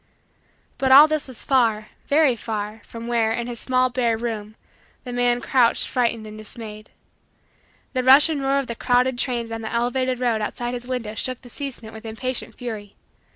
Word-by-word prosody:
But 265 -1 +2
all 285 +3 +10
this 310 -2 -1
was 255 -3 -6
far, 225 -5 +2 0.2
very 290 -3 +4
far, 215 -1 -5
from 230 0 -8
where, 230 -2 +1
in 235 +1 -2
his 240 -1 -6
small 255 0 +1
bare 240 -3 +1
room, 220 -2 -5 0.5
the 245 - -6
man 245 0 +1
crouched 240 -1 +2
frightened 235 -3 0
and 215 0 -9
dismayed. 215 0 -7 1.0
The 255 - +1
rush 265 +4 +7
and 310 -3 -2
roar 270 +1 +1
of 275 - 0
the 235 - -4
crowded 250 +1 +1
trains 235 -3 -2
on 225 0 -4
the 220 - -5
elevated 250 +2 0
road 235 -3 +1
outside 240 +3 -3
his 245 0 -6
window 245 -4 -3
shook 255 +3 -3
the 245 - -14
casement 250 -6 -7
with 220 - -10
impatient 225 0 -4
fury. 215 -5 -7
240 Hz, 185 wpm, -23 LUFS, 225-255 Hz, 1.0 s, all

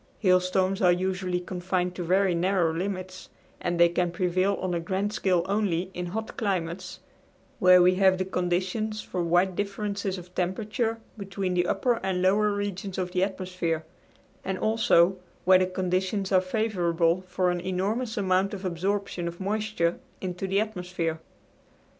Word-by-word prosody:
Hailstorms 185 0 +2
are 180 -2 +6
usually 185 0 -1
confined 180 0 -2
to 180 - -5
very 185 +2 +2
narrow 175 -1 +1
limits, 185 +1 -4 0.3
and 175 -1 -2
they 170 - +8
can 175 +1 0
prevail 185 +3 +1
on 185 -2 -3
a 170 - 0
grand 190 +5 -2
scale 185 -5 +1
only 190 -3 0
in 180 0 -4
hot 220 +5 -5
climates, 185 -5 -3 0.6
where 180 -1 +7
we 180 +1 +5
have 190 -1 +5
the 185 - -1
conditions 190 +4 -1
for 180 - -3
wide 175 +2 +2
differences 200 -1 -2
of 180 0 -11
temperature 215 +6 -1 0.2
between 195 -1 -3
the 175 0 +1
upper 245 -3 +1
and 190 -1 -1
lower 205 +3 +3
regions 200 -1 -3
of 180 -1 -2
the 180 0 +1
atmosphere; 180 -4 -2 0.6
and, 190 0 -2
also, 195 -5 +3 0.3
where 185 0 +7
the 185 - +2
conditions 185 +2 -1
are 185 -1 +5
favorable, 185 -4 +1
for 180 0 +1
an 175 0 -2
enormous 205 +6 -2
amount 190 0 +1
of 195 0 -8
absorption 185 0 -2
of 170 0 -6
moisture 200 -3 -1 0.2
into 185 +1 -4
the 195 +1 +2
atmosphere. 180 -6 -2
185 Hz, 155 wpm, -27 LUFS, 180-200 Hz, 0.6 s, they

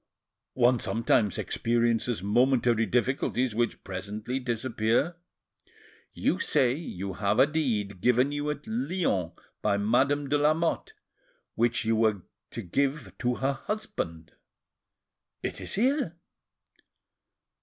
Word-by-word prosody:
"One 125 -1 +4
sometimes 115 -3 +1
experiences 115 -2 0
momentary 120 +1 +3
difficulties, 125 +1 0
which 120 +2 -1
presently 105 +6 -4
disappear." 120 +5 0 0.9
"You - - 0
say 125 -2 +2
you 100 - -5
have 100 +2 0
a - - +7
deed 110 - -1
given 125 +4 +3
you 145 0 -2
at 150 -1 -4
Lyons 180 - -1 0.3
by 100 - +2
Madame 135 +7 +2
de 145 +2 +2
Lamotte, 160 - +1 0.6
which 120 -1 +1
you 115 0 +2
were 110 -4 +2 0.3
to 115 - -6
give 140 - -1
to 125 -1 0
her 135 +2 0
husband?" 85 - -5 1.1
"It - - -4
is - - -4
here." 250 - +1
120 Hz, 110 wpm, -28 LUFS, 110-145 Hz, 1.1 s, a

